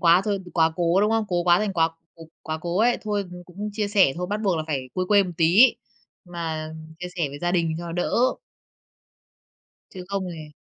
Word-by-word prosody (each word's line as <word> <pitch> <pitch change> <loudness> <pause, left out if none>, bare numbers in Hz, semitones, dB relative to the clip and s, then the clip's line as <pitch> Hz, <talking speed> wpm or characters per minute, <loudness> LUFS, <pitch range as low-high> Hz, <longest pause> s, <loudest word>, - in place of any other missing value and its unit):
quá 175 +1 +5
thôi, 205 -2 0 0.2
quá 160 -1 +3
cố, 175 +2 +2
đúng 210 +2 +2
không? 225 -1 +1
Cố 175 -1 0
quá 175 0 +5
thành 210 -2 -1
quá 165 -2 +3
c - - -19 0.5
quá 155 0 -4
cố 175 +2 -2
ấy, 240 +3 +3
thôi 205 -2 -1 0.2
cũng 200 +4 -6
chia 210 -1 -2
sẻ 195 -9 +4
thôi, 180 +1 -3
bắt 210 +1 -1
buộc 190 -5 +1
là 155 - -1
phải 135 -5 -3
quê 185 - 0
quê 205 -1 +6
một 185 - -5
tí, 180 +10 +6 0.5
mà 160 -3 -5 0.3
chia 180 - -5
sẻ 165 -5 0
với 140 +1 -8
gia 175 +3 -1
đình 165 -3 +1
cho 175 - -6
nó 170 - -5
đỡ. 175 +1 -1 1.8
Chứ 185 -1 -8
không 195 -1 -2
thì 155 -2 -9
175 Hz, 220 wpm, -24 LUFS, 165-200 Hz, 1.8 s, quê